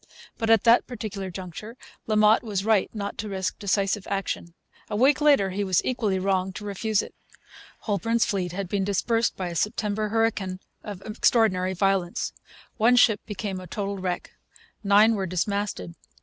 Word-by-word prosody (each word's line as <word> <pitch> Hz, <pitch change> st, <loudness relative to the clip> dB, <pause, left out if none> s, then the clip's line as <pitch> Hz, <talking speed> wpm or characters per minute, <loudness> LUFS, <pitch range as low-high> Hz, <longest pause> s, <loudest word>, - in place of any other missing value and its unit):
But, 225 Hz, -1 st, -1 dB
at 225 Hz, -3 st, +5 dB
that 235 Hz, +1 st, +5 dB
particular 210 Hz, -5 st, -5 dB
juncture, 190 Hz, +6 st, -8 dB, 0.3 s
La 215 Hz, -, +1 dB
Motte 215 Hz, +1 st, +5 dB
was 205 Hz, -4 st, -3 dB
right 220 Hz, -3 st, +3 dB
not 205 Hz, -2 st, -5 dB
to 210 Hz, -, -4 dB
risk 190 Hz, -1 st, -3 dB
decisive 200 Hz, 0 st, 0 dB
action. 195 Hz, -3 st, -3 dB, 0.3 s
A 210 Hz, -, -3 dB
week 265 Hz, +6 st, +3 dB
later 280 Hz, -11 st, +4 dB
he 200 Hz, +2 st, -2 dB
was 185 Hz, -3 st, +2 dB
equally 225 Hz, -6 st, 0 dB
wrong 190 Hz, 0 st, 0 dB
to 210 Hz, +2 st, -8 dB
refuse 205 Hz, +1 st, 0 dB
it. -, -, -11 dB, 0.7 s
Holbourne's 225 Hz, +2 st, 0 dB
fleet 185 Hz, -4 st, -2 dB
had 195 Hz, +1 st, -4 dB
been 195 Hz, +2 st, -1 dB
dispersed 225 Hz, +4 st, 0 dB
by 185 Hz, -2 st, -3 dB
a 170 Hz, -, -6 dB
September 210 Hz, +1 st, -1 dB
hurricane 205 Hz, -4 st, 0 dB, 0.2 s
of 200 Hz, -3 st, -8 dB
extraordinary 210 Hz, -4 st, +2 dB
violence. 190 Hz, -2 st, 0 dB, 0.4 s
One 240 Hz, +2 st, +4 dB
ship 225 Hz, -4 st, +4 dB
became 195 Hz, -2 st, -4 dB
a 185 Hz, -, -10 dB
total 200 Hz, +2 st, -4 dB
wreck. 180 Hz, -1 st, -3 dB, 0.5 s
Nine 210 Hz, +3 st, +5 dB
were 195 Hz, -3 st, -2 dB
dismasted. 185 Hz, -, -2 dB
200 Hz, 165 wpm, -25 LUFS, 190-220 Hz, 0.7 s, at